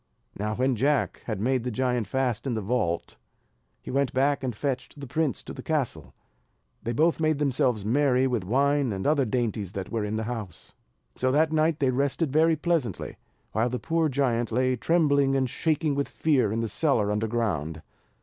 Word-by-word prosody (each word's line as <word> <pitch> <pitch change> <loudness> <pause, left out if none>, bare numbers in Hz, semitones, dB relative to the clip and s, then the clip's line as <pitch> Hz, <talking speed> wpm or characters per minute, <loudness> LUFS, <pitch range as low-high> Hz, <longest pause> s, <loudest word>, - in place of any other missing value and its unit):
Now 105 +1 -2
when 130 +2 +1
Jack 140 +5 +1
had 110 -4 -3
made 125 +3 +1
the 125 - -2
giant 125 -2 0
fast 125 0 -1
in 125 - -1
the 110 - -2
vault, 100 - -1 0.7
he - - -6
went 140 0 +1
back 140 +2 +1
and 125 -4 -2
fetched 135 +2 -3
the 140 - -6
prince 155 +2 -1
to - - -8
the - - -8
castle; 135 - -2 0.7
they 115 - -3
both 160 +8 +2
made 155 -2 +2
themselves 125 -7 +1
merry 130 +2 +3
with 125 -4 0
the 90 - -10
wine 140 +2 +2
and 95 -1 -4
other 145 -2 +3
dainties 110 -5 -2
that 95 -1 -5
were 115 -2 -1
in 105 +1 -2
the 110 - -1
house. 110 -6 -6 0.4
So 130 0 +1
that 155 +2 +3
night 155 0 +2
they 135 -3 +2
rested 140 +3 0
very 160 +1 +4
pleasantly, 155 - -2 0.3
while 115 +4 +1
the 125 - -2
poor 165 +3 0
giant 125 -4 0
lay 130 +2 +2
trembling 140 -1 +2
and 135 -1 +2
shaking 155 +3 0
with 140 0 -1
fear 135 -10 +1
in 115 +1 -1
the 115 - -1
cellar 110 -3 +1
under 105 +2 0
ground. 80 -9 -2
130 Hz, 195 wpm, -26 LUFS, 110-145 Hz, 0.7 s, very